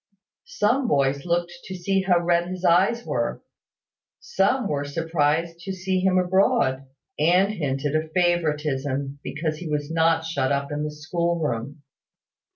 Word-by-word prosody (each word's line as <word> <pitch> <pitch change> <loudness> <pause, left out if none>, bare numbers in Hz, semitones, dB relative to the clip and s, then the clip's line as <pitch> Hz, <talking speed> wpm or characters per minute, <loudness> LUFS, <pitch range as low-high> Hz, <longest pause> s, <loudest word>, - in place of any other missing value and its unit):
Some 265 -4 +1
boys 140 0 +1
looked 175 0 0
to 190 - -6
see 195 +2 0
how 180 -2 +2
red 170 0 +1
his 185 0 -5
eyes 195 +8 +3
were: - - -2 0.8
some 265 - +1
were 145 -4 -1
surprised 165 +2 -1
to 190 +2 -5
see 190 0 -1
him 185 0 +2
abroad, 175 -8 +2 0.3
and 180 +6 +3
hinted 145 -4 -2
a 155 0 0
favouritism 150 -5 0
because 155 0 -3
he 165 -1 -6
was 150 0 -2
not 165 0 +2
shut 140 -5 -1
up 140 0 -1
in 145 0 -2
the 150 - -2
school 170 +3 -2
room. 140 0 -3
165 Hz, 150 wpm, -24 LUFS, 145-180 Hz, 0.8 s, eyes